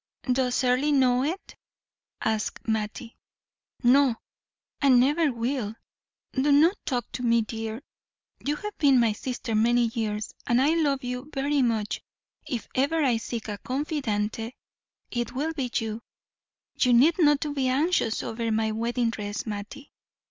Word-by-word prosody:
"Does 255 0 +1
Earle 255 +4 +2
know 255 -3 +4
it?" 340 +7 -4 0.7
asked 220 +1 -2
Mattie. 220 +1 -3 0.7
"No, 255 0 +5 0.7
and 265 -3 +6
never 295 +4 +3
will. 235 -2 -2 0.6
Do 275 +2 +2
not 320 +7 +5
talk 245 -3 -2
to - - -5
me, 235 -2 +3
dear; 225 +3 -5 0.6
you 290 +1 0
have 420 +6 -6
been 275 -4 +5
my 230 -2 +3
sister 245 +1 -4
many 235 +2 +3
years, 215 -2 -3
and 240 +1 +3
I 275 +3 +4
love 285 -5 +1
you 250 +3 -5
very 280 +1 +1
much; 225 -4 0 0.5
if 245 -7 -4
ever 300 +5 +1
I 250 -4 +3
seek 225 0 -5
a 205 -2 -5
confidante 240 -5 -2 0.6
it 240 -1 -2
will 300 +5 -2
be 270 -5 -2
you. 225 0 -2 0.8
You 250 - +4
need 285 +9 +5
not 295 -3 +4
be 270 -2 0
anxious 270 -3 +1
over 225 0 -2
my 220 0 +1
wedding 235 +1 0
dress, 205 -2 -4
Mattie. 210 +6 -7
250 Hz, 145 wpm, -26 LUFS, 225-280 Hz, 0.8 s, and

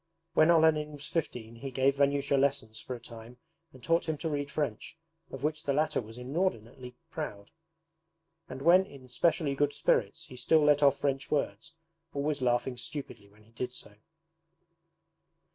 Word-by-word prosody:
When 155 0 +5
Olenin 155 -2 +4
was 145 0 -8
fifteen 120 -9 -4
he 135 +3 -6
gave 135 +1 +2
Vanyusha 140 0 +2
lessons 135 -5 +1
for 125 - -6
a - - -9
time 115 +1 -11 0.3
and 130 -2 -16
taught 165 +2 +1
him 155 - -1
to 160 - -3
read 145 -2 -2
French, 140 0 -3 0.3
of 135 0 -8
which 155 0 -1
the 140 - -1
latter 150 0 +1
was 115 +1 -11
inordinately 125 - -3 0.2
proud; 105 -10 -6 1.0
and 130 +1 -7
when 180 +4 +7
in 140 -8 -13
specially 150 +2 +1
good 145 +1 +1
spirits 100 -3 +1
he 130 - -12
still 150 +5 +3
let 150 0 +4
off 140 -1 +5
French 140 0 -1
words, 130 -5 -2 0.4
always 145 0 -1
laughing 125 0 +1
stupidly 125 -6 -6
when 105 +1 -22
he 110 - -24
did 125 +1 -4
so. 105 - -10
140 Hz, 165 wpm, -30 LUFS, 125-150 Hz, 1.0 s, when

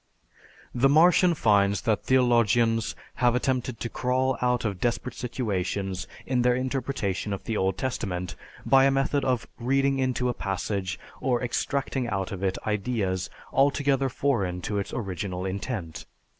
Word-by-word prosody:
The 130 +3 +3
Martian 175 +3 +5
finds 100 -6 +3
that 110 -2 0
theologians 120 -3 +3 0.2
have 120 -1 +3
attempted 125 -1 -1
to - - -1
crawl 130 +2 0
out 125 -1 +1
of 100 -4 -2
desperate 120 0 -1
situations 100 -6 -3 0.2
in 125 -1 +1
their 125 0 +3
interpretation 125 -6 -2
of 100 - -5
the 115 - -3
Old 95 -1 0
Testament 95 -9 -3 0.3
by 135 0 +6
a - - +5
method 135 +1 +1
of 125 -3 0
reading 135 +2 +1
into 130 -1 0
a 125 - +1
passage 95 -2 -3 0.2
or 125 -2 0
extracting 130 +1 -1
out 95 -4 -2
of 95 -2 -5
it 95 -1 0
ideas 100 -4 -1 0.2
altogether 140 -1 +2
foreign 110 -10 0
to 105 +3 -2
its 100 - -4
original 95 -3 -4
intent. 95 -3 -4
120 Hz, 145 wpm, -26 LUFS, 100-130 Hz, 0.3 s, by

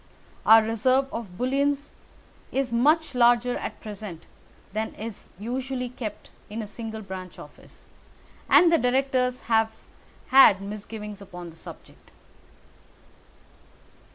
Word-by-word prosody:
Our 225 0 +8
reserve 255 +5 +2
of 200 -6 -6
bullion 275 +4 +1 0.7
is 270 -2 -1
much 295 +6 +3
larger 245 0 +4
at - - -6
present 205 -6 -8 0.5
than 220 +1 -3
is 220 -1 -7
usually 250 +4 -3
kept 235 -3 -7 0.2
in 220 +2 -4
a - - -5
single 220 +1 -7
branch 185 -2 -8
office, - - -15 0.6
and 345 -1 +7
the 330 - +5
directors 255 0 +1
have 225 -1 +2 0.6
had 260 -7 +8
misgivings 210 +1 -7
upon 180 -3 -9
the - - -17
subject." 165 - -13
230 Hz, 115 wpm, -25 LUFS, 210-255 Hz, 0.7 s, Our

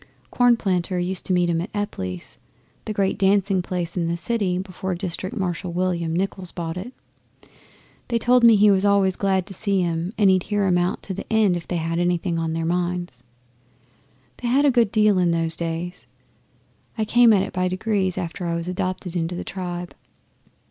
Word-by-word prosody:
Cornplanter 195 -7 +2
used 180 +1 -2
to - - -2
meet 180 -1 +3
him 165 -1 0
at 180 - -5
Epply's 95 - -5 0.5
the - - -3
great 200 -1 0
dancing 195 -1 +3
place 175 -1 -4
in 170 -2 0
the 170 +1 -1
city 195 -2 -1
before 185 0 -4
District 185 +1 -3
Marshal 180 -1 -2
William 175 -2 -1
Nichols 185 +1 -2
bought 165 -2 -4
it. 190 +7 -6 1.2
They 235 - 0
told 245 +1 +3
me 230 -1 +8
he 205 0 +6
was 195 -1 +2
always 200 -2 +3
glad 190 -2 0
to 195 - -9
see 195 -1 0
'em, 170 +3 -2
and 205 -2 +4
he'd 185 -1 +3
hear 205 -1 +1
'em 180 -2 +3
out 175 +1 -1
to 195 - -4
the 195 - -8
end 215 -5 +3
if 175 - -6
they 180 - -3
had 165 +1 -2
anything 175 -1 0
on 165 -1 -2
their 165 0 -2
minds. 175 -5 -2 1.2
They 245 - -4
had 270 +4 +3
a 285 - +5
good 235 -5 +2
deal 210 -3 +3
in 175 -1 +2
those 165 -1 0
days. 170 +1 -4 0.9
I 220 - 0
came 240 +1 +5
at 195 -3 +4
it 195 - -6
by 185 0 0
degrees, 190 0 -1
after 175 +1 -4
I 170 - -1
was 170 +1 -4
adopted 185 -1 -3
into 170 0 -1
the - - -4
tribe. 175 -2 -5
185 Hz, 195 wpm, -23 LUFS, 175-200 Hz, 1.2 s, me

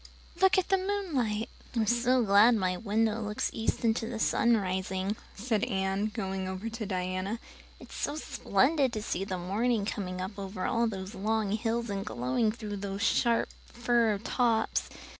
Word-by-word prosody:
Look 380 0 +6
at 375 - +1
the 385 -1 +4
moonlight." 300 - -1 0.3
"I'm 225 -2 +2
so 240 +3 +3
glad 210 +3 +6
my 185 -3 0
window 220 +3 0
looks 210 0 -2
east 225 +1 -1
into 225 0 +1
the 235 -1 -4
sun 235 +1 +3
rising," 190 +1 -2 0.2
said 220 -1 0
Anne, 195 +1 0
going 195 -4 -3
over 190 +4 -4
to 225 -2 -5
Diana. 185 +3 -2 0.4
"It's - - -12
so - - -1
splendid 270 -1 +1
to 215 -2 -3
see 190 - -2
the 190 -2 -3
morning 205 +5 0
coming 185 -3 -3
up 195 +2 -5
over 195 -1 -3 0.2
those 190 0 -6
long 215 0 0
hills 230 +1 -1
and 195 -1 -2
glowing 130 - 0
through 215 -2 -6
those 200 +1 -4
sharp 230 0 +2 0.2
fir 235 -3 +2
tops. 230 +1 +1
215 Hz, 160 wpm, -30 LUFS, 195-235 Hz, 0.4 s, Look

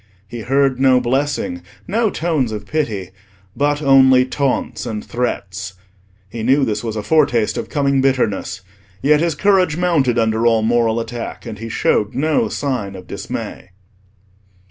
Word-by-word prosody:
He 120 +3 -7
heard 135 +2 +1
no 130 -1 +5
blessing, 125 -8 -1 0.3
no 220 +3 +1
tones 155 - -1
of 105 -1 -5
pity, 105 - -2 0.4
but 145 +1 0
only 130 -2 +6
taunts 130 -1 -2
and 110 -2 -5
threats. 100 -6 -3 0.5
He 115 +3 -7
knew 135 +4 +3
this 110 -2 -2
was 110 -2 -3
a 105 - -3
foretaste 125 -4 +2
of - - -4
coming 140 -3 +1
bitterness; 130 -9 0 0.4
yet 150 +2 +4
his 165 -1 0
courage 190 -6 +2
mounted 155 -9 +1
under 115 0 +2
all 115 -1 +3
moral 115 0 +2
attack, 115 +1 -6
and 110 -3 -7
he 115 +1 -6
showed 105 -1 0
no 155 +2 +1
sign 125 -9 -3
of 90 -1 -10
dismay. 90 - -6
125 Hz, 150 wpm, -18 LUFS, 110-145 Hz, 0.5 s, only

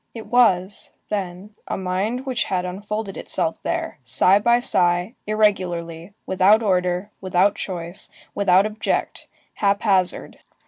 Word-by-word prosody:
It 225 - -7
was, 205 -5 +2 0.2
then, 195 0 -4
a - - -3
mind 195 +7 -2
which 255 -3 -1
had 180 -2 -1
unfolded 200 +2 -5
itself 160 - -2
there, - - -3
sigh 130 - +4
by 235 +3 +4
sigh, 175 -2 +1
irregularly, 185 -4 -1
without 195 +4 +4
order, 180 0 0
without 190 +1 +2
choice, 175 0 -6 0.2
without 195 -1 +4
object, 215 +1 -2 0.3
hap 200 -1 0
hazard. 190 -4 0
195 Hz, 125 wpm, -22 LUFS, 180-210 Hz, 0.3 s, sigh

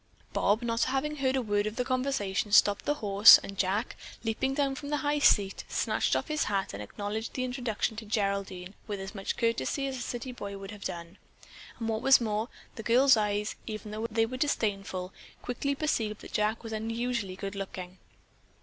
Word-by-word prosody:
Bob, 210 +4 +2
not 230 0 +1
having 300 +3 -1
heard 265 -1 +1
a 260 - 0
word 205 -1 +1
of 215 - -4
the 250 - -1
conversation, 255 -6 -1
stopped 205 0 +5
the 295 - +1
horse, 205 -3 +8
and 195 - -8
Jack, 205 +5 0 0.3
leaping 240 +4 -1
down 280 -2 +1
from 285 +1 -7
the 295 - +1
high 295 0 +2
seat, 200 -8 +3
snatched - - +1
off - - -1
his 305 -2 0
hat 195 -2 -1
and 100 - -6
acknowledged 205 - -5
the 255 - -1
introduction 245 -3 -2
to 220 - -6
Geraldine 200 -3 -2
with 205 -2 -4
as 195 +1 -6
much 195 -2 -3
courtesy 230 - 0
as 270 -1 -3
a - - -6
city 245 +1 -4
boy 200 -5 -6
would 195 +1 -8
have 210 -1 -10
done; 170 +1 -6 0.6
and 225 - -4
what 220 0 -1
was 270 +2 +7
more, 220 0 -1 0.3
the - - -4
girl's 250 +4 +5
eyes, 210 -1 -1
even 215 -1 -6
though 220 +2 -3
they 225 0 +2
were 255 +3 -5
disdainful, 195 -8 -1 0.3
quickly 280 +3 -2
perceived 225 -9 -1
that - - -11
Jack 215 +2 0
was 225 -1 -6
unusually 230 -2 -2
good 195 +1 -5
looking. 185 -2 -7
220 Hz, 195 wpm, -29 LUFS, 200-250 Hz, 0.6 s, horse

